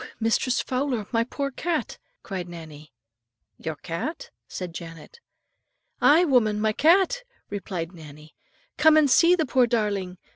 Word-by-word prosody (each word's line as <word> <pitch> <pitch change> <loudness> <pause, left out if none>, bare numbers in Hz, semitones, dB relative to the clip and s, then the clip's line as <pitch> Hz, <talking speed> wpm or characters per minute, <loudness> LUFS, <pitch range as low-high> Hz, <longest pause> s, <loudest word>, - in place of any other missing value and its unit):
Mistress 230 +3 +1
Fowler, 255 -4 -2
my 230 -1 +2
poor 275 +3 -4
cat," 330 +4 -3 0.2
cried 185 -4 -5
Nannie. 155 -3 -11 0.7
"Your 160 -1 -4
cat?" 310 - -5 0.2
said 180 -2 -6
Janet. 165 - -10 0.8
"Aye, 325 +5 +6
woman, 225 -8 +2
my 215 0 +1
cat," 380 - +3 0.3
replied 180 -4 -4
Nannie; 155 -2 -13 0.4
"come 315 0 +6
and 295 -4 +4
see 335 +9 +6
the 320 -3 0
poor 255 -1 +3
darling. 205 -6 -1
225 Hz, 135 wpm, -25 LUFS, 175-290 Hz, 0.8 s, Aye